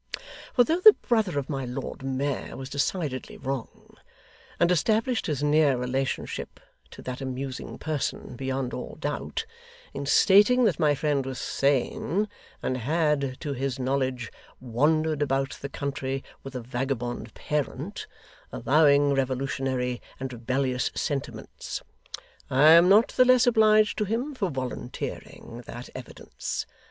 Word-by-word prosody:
For 245 - +7
though 325 +8 +1
the 430 +3 +10
brother 220 - +2
of 140 -1 -1
my 135 -3 -3
Lord 125 +2 -5
Mayor 135 +1 -2
was 135 0 -7
decidedly 140 -2 -2
wrong; 135 -3 -6 0.6
and 170 +1 +4
established 220 - +1
his 145 -3 -1
near 150 -2 +4
relationship 130 +2 -3 0.3
to - - -12
that 130 +1 -5
amusing 130 0 -5
person 150 -4 -3
beyond 130 0 -3
all - - -6
doubt, - - -3 0.5
in 140 - -5
stating 205 - +6
that 210 -7 +2
my 150 -2 +3
friend 145 -1 0
was 130 0 -5
sane, 145 - 0 0.4
and 130 - -1
had, 140 0 0
to 145 -3 -3
his 135 0 -2
knowledge, 130 -2 -1 0.3
wandered 150 +5 +1
about 135 -1 0
the 140 - -5
country 135 -1 -3 0.2
with 135 -1 -9
a 125 - -3
vagabond 120 -2 -3
parent, 150 +5 -3 0.4
avowing 145 +2 +4
revolutionary 130 -1 -1 0.2
and 130 -1 -4
rebellious 125 +2 -1
sentiments; 140 -2 -4 0.7
I 145 +4 +6
am 170 +2 +8
not 210 +4 +6
the 255 - +4
less 255 0 +5
obliged 215 -3 +4
to 210 - +1
him 240 +8 -2
for 200 -8 -1
volunteering 125 -2 -6
that 120 +1 -8
evidence. 130 -2 -6
140 Hz, 135 wpm, -26 LUFS, 130-160 Hz, 0.7 s, the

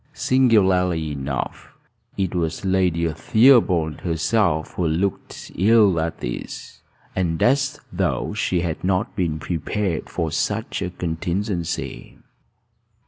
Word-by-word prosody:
Singularly 95 - +2
enough, 70 -1 -5 0.4
it 95 -3 -1
was 85 +1 -2
Lady 90 -3 +2
Theobald 90 - +4
herself 85 -1 0
who 90 - -1
looked 90 +5 -3
ill 100 -2 +4
at 80 +1 -3
ease, - - -6 0.3
and 85 -3 0
as 140 +3 +2
though - - -1
she 90 -2 0
had 85 -2 -3
not 95 +4 0
been 85 -5 -1
prepared 85 +3 -2
for 80 -2 -2
such 80 - -2
a - - -2
contingency. 85 +1 -3
90 Hz, 110 wpm, -22 LUFS, 80-100 Hz, 0.4 s, Theobald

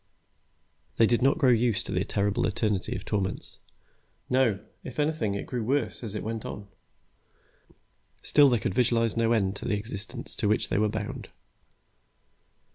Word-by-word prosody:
They 115 - +6
did 120 +2 +2
not 135 +3 +4
grow 135 -6 +4
used 120 -2 +2
to - - -5
the - - +1
terrible 100 0 0
eternity 105 -3 -1
of 95 - -6
torments. 100 -2 -2 0.7
No, 125 -6 +3 0.2
if 130 - -7
anything, 145 -9 0
it 100 - -4
grew 125 -3 -3
worse 125 0 -1
as 110 -2 -5
it - - -3
went 110 0 -4
on. 100 0 -7 1.6
Still, 145 -2 +6
they 120 - +3
could 95 - -2
visualize 115 -1 +2
no 115 0 +2
end 100 -4 +2
to - - -8
the 110 -4 +1
existence 100 -1 -5
to - - +1
which 105 - +1
they 90 - +1
were 105 0 +2
bound. 105 0 -5
110 Hz, 165 wpm, -27 LUFS, 105-120 Hz, 1.6 s, They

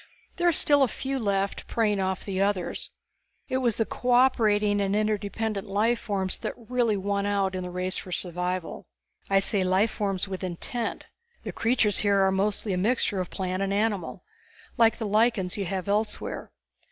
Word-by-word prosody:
There 350 - +2
are - - +6
still 290 -2 +3
a 270 - +5
few 270 +3 -3
left, 200 -3 -1
preying 210 -3 +1
off 190 0 -2
the 195 -1 -2
others. 195 -3 -1 0.6
It 260 - 0
was 240 -4 +1
the 225 - +1
cooperating 220 -5 +3
and 200 0 0
interdependent 215 0 -1
life 220 +4 +1
forms 195 -4 -2
that - - -4
really 235 -2 0
won 200 +1 -1
out 200 -2 +1
in 185 - -3
the 180 - -5
race 180 +1 -2
for 185 - -7
survival. 180 0 -3 0.4
I 195 - +4
say 195 0 +1
life 190 +4 +2
forms 195 -2 -1
with 190 -1 -5
intent. 205 +7 -3 0.4
The - - -4
creatures 225 -3 +2
here 200 -2 +3
are 190 - +3
mostly 200 +1 0
a - - 0
mixture 205 -1 +1
of 180 - -3
plant 185 -1 -3
and 195 0 0
animal, 205 -3 -1 0.5
like 230 -2 +4
the 225 - -3
lichens 210 -3 +2
you 200 -2 -2
have 185 +1 -3
elsewhere. 210 +2 -2
205 Hz, 175 wpm, -27 LUFS, 190-225 Hz, 0.6 s, are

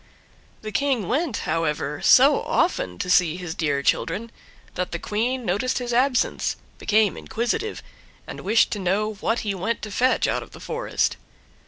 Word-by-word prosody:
The 215 - -5
King 255 -4 0
went, 280 - 0
however, 155 -1 -1
so - - +6
often 90 -1 0
to - - -3
see 180 -2 +3
his 175 -3 -5
dear 145 -6 -1
children, 210 +11 0 0.4
that 180 0 -3
the - - -1
Queen 235 +7 -2
noticed 205 +8 0
his 245 -2 -3
absence, 250 +1 +1 0.2
became 215 -2 +2
inquisitive, 240 - -3 0.4
and - - -8
wished 215 +4 +3
to 210 - -2
know 200 +4 0
what 225 +3 -1
he 205 -2 -2
went 195 +5 -3
to 215 - -5
fetch 255 +5 +2
out - - 0
of - - -12
the - - -11
forest. - - -1
215 Hz, 165 wpm, -24 LUFS, 180-245 Hz, 0.4 s, so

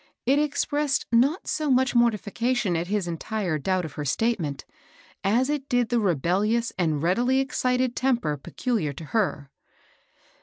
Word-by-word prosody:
It 275 +4 +3
expressed 295 -1 0
not 265 +9 +2
so 305 -2 -1
much 260 0 +3
mortification 235 -2 +1
at 165 +1 -2
his 200 -2 -1
entire 175 0 -2
doubt 185 +3 0
of 155 - -8
her 150 - -4
statement, 155 - -1 0.6
as 230 +6 +2
it 290 -2 -3
did 245 -3 +1
the 240 - +2
rebellious 205 - +1
and 160 -5 0
readily 245 +10 +2
excited 255 -2 0
temper 240 - +1
peculiar 160 - -2
to 150 - -9
her. 150 -11 0
225 Hz, 145 wpm, -25 LUFS, 175-255 Hz, 0.6 s, It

